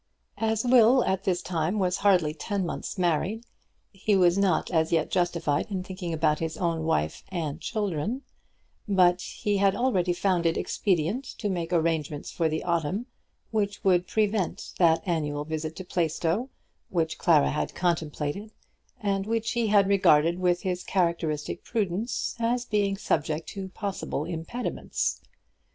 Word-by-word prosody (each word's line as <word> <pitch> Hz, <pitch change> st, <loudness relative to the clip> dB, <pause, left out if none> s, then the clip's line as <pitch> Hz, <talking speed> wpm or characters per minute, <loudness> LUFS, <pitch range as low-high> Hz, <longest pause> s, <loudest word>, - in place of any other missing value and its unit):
As 220 Hz, 0 st, +1 dB
Will 245 Hz, 0 st, +6 dB
at 190 Hz, 0 st, -1 dB
this 180 Hz, -2 st, 0 dB
time 175 Hz, +3 st, -1 dB
was 185 Hz, -2 st, +1 dB
hardly 180 Hz, -7 st, +3 dB
ten 195 Hz, +3 st, -2 dB
months 170 Hz, -, -5 dB
married, 185 Hz, +6 st, 0 dB, 0.5 s
he 200 Hz, +1 st, +1 dB
was 180 Hz, -2 st, +4 dB
not 195 Hz, -4 st, +1 dB
as 160 Hz, -2 st, +2 dB
yet 160 Hz, -2 st, +1 dB
justified 175 Hz, -4 st, 0 dB
in 190 Hz, -3 st, -3 dB
thinking 185 Hz, -2 st, -5 dB
about 155 Hz, -1 st, +1 dB
his 160 Hz, -1 st, -3 dB
own 165 Hz, -3 st, -1 dB
wife 80 Hz, -, 0 dB
and 165 Hz, -6 st, -3 dB
children; 210 Hz, -, -2 dB, 0.7 s
but 180 Hz, -2 st, +4 dB
he 205 Hz, +2 st, -2 dB
had 195 Hz, 0 st, +3 dB
already 195 Hz, -8 st, +1 dB
found 175 Hz, -1 st, +1 dB
it 165 Hz, -, +1 dB
expedient 190 Hz, -, 0 dB
to 210 Hz, -3 st, -2 dB
make 170 Hz, -2 st, -3 dB
arrangements 160 Hz, -3 st, 0 dB
for 165 Hz, -2 st, 0 dB
the 155 Hz, +1 st, -2 dB
autumn, 170 Hz, +6 st, -1 dB, 0.5 s
which 205 Hz, -2 st, -1 dB
would 180 Hz, -2 st, +3 dB
prevent 210 Hz, -4 st, -1 dB
that 165 Hz, -2 st, +4 dB
annual 150 Hz, -4 st, -1 dB
visit 160 Hz, 0 st, -4 dB
to 185 Hz, -, -6 dB
Plaistow 170 Hz, -, 0 dB, 0.4 s
which 165 Hz, -3 st, -1 dB
Clara 160 Hz, -5 st, +4 dB
had 150 Hz, -, -2 dB
contemplated, 170 Hz, +3 st, -2 dB, 0.5 s
and 195 Hz, -1 st, 0 dB
which 225 Hz, 0 st, 0 dB
he 235 Hz, -2 st, 0 dB
had 205 Hz, -2 st, +4 dB
regarded 170 Hz, -4 st, +4 dB
with 180 Hz, -1 st, +1 dB
his 180 Hz, -1 st, -2 dB
characteristic 170 Hz, -5 st, -1 dB
prudence 215 Hz, +2 st, -2 dB
as 240 Hz, +1 st, 0 dB
being 205 Hz, -3 st, 0 dB
subject 155 Hz, -4 st, -1 dB
to 195 Hz, -1 st, -6 dB
possible 190 Hz, -6 st, -4 dB
impediments. 170 Hz, +9 st, -3 dB
180 Hz, 150 wpm, -27 LUFS, 160-200 Hz, 0.7 s, Will